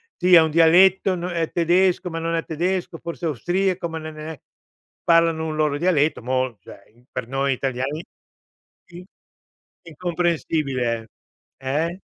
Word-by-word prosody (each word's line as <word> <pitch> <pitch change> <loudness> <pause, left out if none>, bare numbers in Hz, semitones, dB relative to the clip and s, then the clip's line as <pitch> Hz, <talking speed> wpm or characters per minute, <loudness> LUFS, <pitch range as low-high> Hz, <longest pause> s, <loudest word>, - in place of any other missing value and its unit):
Sì, 180 +1 +2
è 165 - +9
un 160 -1 +1
dialetto 180 +4 +5
n 175 - -6
è 170 -2 -2
tedesco, 180 +1 +2
ma 165 -1 -4
non 165 0 -1
è 165 - -1
tedesco, 175 +2 -2
forse 170 +1 -6
austriaco, 175 +4 -1
ma 165 - -5
non 155 -1 -8
è 155 -2 -7 0.6
parlano 165 -1 +3
un 155 - -3
loro 150 -2 +1
dialetto 160 -4 +1
mol 130 -1 -1
cioè, 115 +5 -16
per 125 -2 -5
noi 135 +2 0
italiani, 135 +4 -3 0.8
in 175 +1 -11 0.8
incomprensibile, 155 -8 -2 0.5
eh. 155 +7 -2
160 Hz, 140 wpm, -22 LUFS, 140-175 Hz, 0.8 s, è